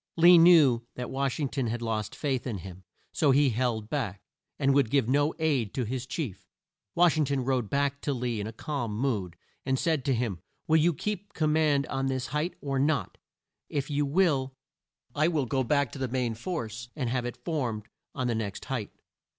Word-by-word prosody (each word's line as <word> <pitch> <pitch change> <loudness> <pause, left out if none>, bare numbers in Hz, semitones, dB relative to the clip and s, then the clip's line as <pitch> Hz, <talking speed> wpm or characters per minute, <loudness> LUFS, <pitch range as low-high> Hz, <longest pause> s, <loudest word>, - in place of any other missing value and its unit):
Lee 170 +1 +8
knew 155 -9 +6
that 125 0 -5
Wash 135 -1 -1
ing 145 - +1
ton 130 -2 -2
had 120 +2 -2
lost 110 -2 -2
faith 135 -4 -2
in 115 -5 -3
him, 95 +1 -10 0.3
so 150 - +2
he 140 0 +4
held 115 -2 -1
back, 115 -8 -3 0.4
and 140 -1 +3
would 140 -5 +3
give 135 -3 +2
no 145 +4 +2
aid 140 - 0
to 130 - 0
his 125 +2 -4
chief. 130 - -5 0.5
Wash 170 -2 +4
ing 155 - +3
ton 135 -2 -1
rode 125 -5 0
back 140 0 0
to 145 - -1
Lee 120 -4 -2
in 105 - -3
a - - -5
calm 120 -4 -4
mood, 105 -9 -1 0.3
and 130 0 0
said 155 -2 0
to 135 -3 +2
him; 115 -7 -2 0.3
"Will 160 - +5
you 165 +2 +4
keep 205 +2 -4
the - - -16
com 155 -1 +3
mand 150 -3 +3
on 135 0 -2
this 130 -1 -1
height, 155 +4 -1
or 135 -2 -1
not? 145 +2 0 0.5
If 140 0 -2
you 145 0 +1
will, 140 -5 +1 0.6
I 155 +2 +2
will 155 -6 +1
go 130 +2 0
back 140 -1 +1
to - - -8
the 130 - -1
main 125 -2 -1
force 120 - -5
and 135 -5 -2
have 120 0 -1
it 120 - -9
formed 125 -10 -2 0.3
on 130 - -2
the 120 - +1
next 110 -3 -4
height." 125 -6 -3
135 Hz, 210 wpm, -28 LUFS, 120-145 Hz, 0.6 s, Lee